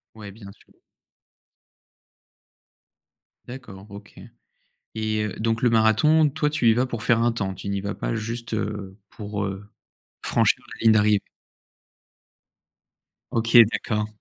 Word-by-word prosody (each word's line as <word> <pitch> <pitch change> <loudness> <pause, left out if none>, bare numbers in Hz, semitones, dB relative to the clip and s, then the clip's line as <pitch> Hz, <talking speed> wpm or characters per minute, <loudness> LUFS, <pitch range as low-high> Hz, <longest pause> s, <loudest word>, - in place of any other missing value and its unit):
Ouais, 105 -2 -10
bien 100 -2 -12
sûr. - - -25 2.8
D'accord, 110 -6 -10
OK, 100 +1 -13 0.8
et, 110 -1 -1
heu, 105 - -5
donc 115 +2 -1
le 125 - +3
marathon, 115 +8 +4
toi, 150 +1 -1
tu 145 -6 +2
y - - +4
vas 125 +2 0
pour 120 -4 -5
faire 115 -1 +2
un 120 0 +2
temps? 100 -4 -3
Tu 100 - -7
n'y 100 -1 -2
vas 100 0 -4
pas - - -3
juste, 115 +1 -5
heu, 100 -3 -5
pour, 105 -1 -5
heu, 95 +1 -7 0.5
franchir - - +1
la - - -9
ligne 110 - +7
d'arrivée? 105 -1 +3 2.1
OK, 115 0 +6
d'accord. 105 -1 -2
110 Hz, 135 wpm, -23 LUFS, 100-115 Hz, 2.8 s, ligne